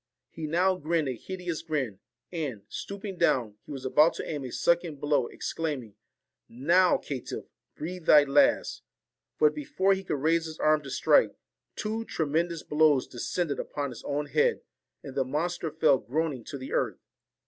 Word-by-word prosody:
He 160 Hz, -1 st, -5 dB
now 180 Hz, +4 st, +2 dB
grinned 160 Hz, -2 st, 0 dB
a 130 Hz, -, -1 dB
hideous 180 Hz, +4 st, -5 dB
grin, 140 Hz, -, -2 dB, 0.3 s
and, 145 Hz, -, -4 dB
stooping 200 Hz, -1 st, -6 dB
down, 120 Hz, -11 st, +2 dB
he -, -, -9 dB
was 135 Hz, -2 st, -6 dB
about 150 Hz, +5 st, +4 dB
to -, -, -5 dB
aim 150 Hz, -3 st, -3 dB
a 125 Hz, -, -6 dB
second 170 Hz, -2 st, +1 dB
blow, 145 Hz, -4 st, +1 dB
exclaiming, 145 Hz, -10 st, -4 dB, 0.4 s
* -, -, -58 dB, 0.2 s
Now, 180 Hz, 0 st, +6 dB
caitiff, 135 Hz, -4 st, -6 dB, 0.3 s
breathe 175 Hz, +2 st, -6 dB
thy 150 Hz, -1 st, +8 dB
last.' 275 Hz, -, +3 dB, 0.6 s
But 450 Hz, -1 st, +4 dB
before 285 Hz, -10 st, +1 dB
he 190 Hz, 0 st, -3 dB
could -, -, -2 dB
raise 165 Hz, +4 st, +2 dB
his 160 Hz, -1 st, -7 dB
arm 155 Hz, 0 st, +3 dB
to 140 Hz, -, -9 dB
strike, -, -, +3 dB, 0.4 s
two 220 Hz, +1 st, -2 dB
tremendous 165 Hz, 0 st, -1 dB
blows 150 Hz, -3 st, +3 dB
descended 145 Hz, +5 st, -2 dB
upon 140 Hz, -2 st, -3 dB
his 120 Hz, -, -10 dB
own 145 Hz, +1 st, -2 dB
head, 470 Hz, -, +2 dB, 0.4 s
and 140 Hz, -, -8 dB
the 135 Hz, 0 st, +1 dB
monster 160 Hz, +5 st, -2 dB
fell 150 Hz, -3 st, +3 dB
groaning 145 Hz, -2 st, -2 dB
to 140 Hz, -, -6 dB
the 130 Hz, 0 st, -7 dB
earth. -, -, 0 dB
155 Hz, 170 wpm, -28 LUFS, 140-175 Hz, 0.6 s, thy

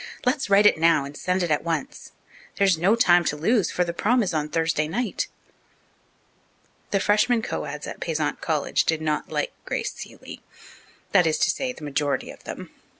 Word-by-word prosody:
Let's 265 Hz, -2 st, 0 dB
write 200 Hz, +1 st, +5 dB
it 205 Hz, -, +5 dB
now, 165 Hz, -3 st, +4 dB
and 140 Hz, +1 st, -9 dB
send 180 Hz, +4 st, -1 dB
it 170 Hz, -, -1 dB
at 150 Hz, -, +1 dB
once. 170 Hz, -, -4 dB, 0.4 s
There 200 Hz, -, +2 dB
is 190 Hz, -3 st, +4 dB
no 180 Hz, +7 st, +3 dB
time 175 Hz, -7 st, +5 dB
to 150 Hz, -, 0 dB
lose, 210 Hz, +7 st, +2 dB
for 180 Hz, -, 0 dB
the 170 Hz, -1 st, -3 dB
'prom' 235 Hz, +7 st, +2 dB
is 185 Hz, -, -2 dB
on 150 Hz, -1 st, -1 dB
Thursday 160 Hz, -1 st, 0 dB
night." 225 Hz, +5 st, -2 dB, 1.6 s
The 195 Hz, -, +1 dB
freshmen 215 Hz, +4 st, +2 dB
co -, -, -3 dB
eds 150 Hz, +1 st, -6 dB
at -, -, -7 dB
Payzant 155 Hz, -3 st, -2 dB
College 155 Hz, -3 st, 0 dB
did 160 Hz, -1 st, +1 dB
not 155 Hz, -1 st, -2 dB
like -, -, -2 dB
Grace -, -, -3 dB
Seeley -, -, -10 dB, 0.7 s
that 180 Hz, -4 st, +5 dB
is 155 Hz, -, +1 dB
to -, -, +3 dB
say, 260 Hz, -2 st, -3 dB
the 245 Hz, -, -12 dB
majority 145 Hz, 0 st, -1 dB
of -, -, -16 dB
them. -, -, -7 dB
175 Hz, 195 wpm, -24 LUFS, 155-210 Hz, 1.6 s, write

